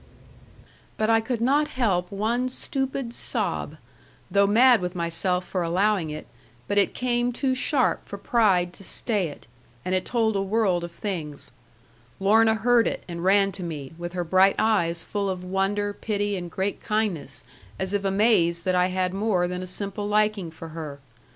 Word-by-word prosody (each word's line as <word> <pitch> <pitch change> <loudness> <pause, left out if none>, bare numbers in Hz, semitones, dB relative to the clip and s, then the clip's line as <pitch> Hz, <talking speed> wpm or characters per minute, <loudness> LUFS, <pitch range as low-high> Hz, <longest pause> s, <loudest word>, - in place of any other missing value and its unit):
But 220 +1 +2
I 225 0 +4
could 230 0 -3
not 285 +5 +3
help 190 -10 0
one 230 +5 0
stupid 270 -1 -3
sob, - - -2 0.5
though 200 0 +4
mad 235 +2 +5
with 180 +1 -3
myself 180 +2 -1
for 185 - -2
allowing 180 0 +1
it, 150 0 -6 0.4
but 205 0 +2
it 200 - +1
came 245 -1 0
too 260 +2 0
sharp 255 +1 +1
for 200 - -6
pride 195 -5 +2
to 195 - -11
stay 205 -1 -1
it, 145 - -11 0.4
and 185 - -1
it 185 - +1
told 225 -3 0
a 195 - +1
world 195 -3 +1
of 170 - -6
things. 165 -6 -5 0.7
Lorna 220 +3 +4
heard 235 +2 +3
it, - - -3
and 170 -1 -6
ran 195 +1 +4
to 190 0 -6
me, 155 -5 -6
with 175 +1 -6
her 180 -1 -1
bright 190 +3 +4
eyes 170 -6 +1
full 200 -1 -2
of 185 -1 -4
wonder, 195 +2 -1
pity, 205 -1 -2
and 175 -2 -5
great 190 +4 -3
kindness, 210 -8 -2 0.3
as 190 +1 -2
if 200 -1 0
amazed 195 -4 +2
that 185 - +2
I 180 0 +3
had 185 0 -1
more 195 -3 +1
than 180 0 -4
a 185 - -6
simple 200 +2 -3
liking 210 -3 +1
for 160 0 -10
her. 155 -3 -7
195 Hz, 175 wpm, -25 LUFS, 180-220 Hz, 0.7 s, mad